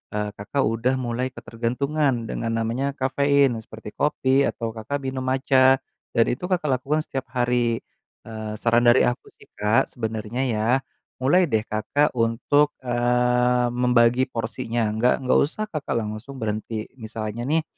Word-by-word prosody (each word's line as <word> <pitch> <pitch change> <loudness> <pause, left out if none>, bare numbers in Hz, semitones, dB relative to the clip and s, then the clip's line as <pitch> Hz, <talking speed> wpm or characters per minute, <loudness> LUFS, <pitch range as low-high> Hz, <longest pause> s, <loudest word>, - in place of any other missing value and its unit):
eee, 105 0 -1
Kakak 135 +7 -1
udah 115 +4 +1
mulai 125 0 -2
ketergantungan 125 +3 -1
dengan 115 0 -3
namanya 120 +5 -1
kafein 140 -2 +2
seperti 110 -1 -10
kopi 140 0 +2
atau 115 -1 -3
Kakak 115 +6 -5
minum 130 -1 -3
matcha 130 0 +4 0.4
dan 115 -2 +3
itu 125 - -2
Kakak 175 -4 +1
lakukan 150 +4 0
setiap 135 -4 -4
hari. 120 -2 +1 0.5
Eee, 110 -1 -6
saran 120 0 +3
dari 120 +1 +5
aku 120 - -3
sih, - - -17
Kak, 105 +2 +2
sebenernya 110 +1 -3
ya, 110 -4 0 0.6
mulai 175 +6 +4
deh 110 -6 +1
Kakak 110 +8 0
untuk, 125 +5 +1
eee, 125 0 +2
membagi 125 0 +3
porsinya. 115 -1 -2
Nggak 125 +5 +1
nggak 130 - +3
usah 165 +9 0
Kakak 150 -6 -3
langsung 110 +6 -7
berhenti. 110 -2 -3 0.2
Misalnya 110 +1 -5
nih 160 +2 +2
120 Hz, 145 wpm, -24 LUFS, 115-135 Hz, 0.6 s, dari